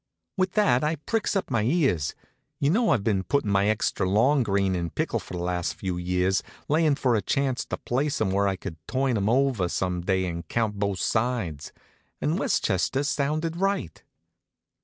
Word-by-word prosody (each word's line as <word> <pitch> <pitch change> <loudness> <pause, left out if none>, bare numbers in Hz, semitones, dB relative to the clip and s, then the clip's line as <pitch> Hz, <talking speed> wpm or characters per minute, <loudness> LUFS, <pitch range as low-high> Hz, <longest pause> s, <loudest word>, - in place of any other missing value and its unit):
With 185 -2 0
that 130 - +3
I 155 +2 +1
pricks 210 +9 -2
up 195 - -1
my 115 - +2
ears. 120 - +1 0.4
You 140 - +2
know 225 +4 +2
I've 115 -7 +2
been 100 -3 +1
puttin' 110 0 0
my 100 +1 +3
extra 105 -3 0
long 130 +8 +4
green 100 -4 +1
in 85 -2 -2
pickle - - -1
for - - -8
the 85 - -3
last 90 -1 -1
few 95 -2 -3
years, 90 +2 +1 0.3
layin' 155 -1 +3
for 130 -3 +1
a 110 - +2
chance 135 +1 0
to - - -4
place 140 +4 -1
'em 105 -4 +1
where 100 +1 +2
I 95 - 0
could 80 -3 -7
turn 130 -1 0
'em 100 0 +1
over 125 -7 +2
some 90 0 -1
day 95 +1 +1
and 85 -2 -5
count 110 -1 -1
both 100 -2 0
sides. 110 - -1 0.5
And - - 0
Westchester 135 - +1
sounded 155 +3 -1
right. 195 - -1
110 Hz, 185 wpm, -26 LUFS, 95-140 Hz, 0.5 s, long